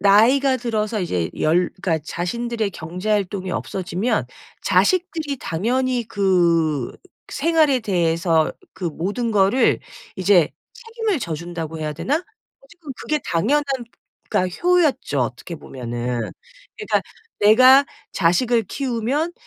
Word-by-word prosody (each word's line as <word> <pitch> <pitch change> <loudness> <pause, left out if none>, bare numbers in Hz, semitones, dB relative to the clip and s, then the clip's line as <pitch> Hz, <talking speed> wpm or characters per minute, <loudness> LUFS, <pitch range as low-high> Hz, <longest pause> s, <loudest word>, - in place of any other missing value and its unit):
나이가 250 +7 +5
들어서 220 -3 -2
이제 90 - -1
열 175 +3 +2
그러니까 165 -4 +1
자신들의 225 +5 -2
경제활동이 185 +3 -2
없어지면 190 +5 -2 0.4
자식들이 330 -6 +1
당연히 245 +8 -1
그 170 - +2 0.4
생활에 310 -3 +2
대해서 170 -5 +1 0.2
그 185 - -8
모든 200 +9 -2
거를 200 +6 +3 0.4
이제 185 -3 +4 0.2
책임을 455 -5 -3
져 170 -10 -3
준다고 165 -1 -6
해야 155 -1 -3
되나? 290 - -1 0.4
어쨌건 345 - -11
그게 305 - -1
당연한 255 - +1 0.6
그니까 185 0 +1
효였죠, 330 - +2
어떻게 125 +7 -3
보면은. 120 -3 -4 0.5
그러니까 425 - 0 0.4
내가 255 +6 +7 0.3
자식을 225 +7 +2
키우면 270 - -2
205 Hz, 275 characters per minute, -21 LUFS, 170-260 Hz, 0.6 s, 내가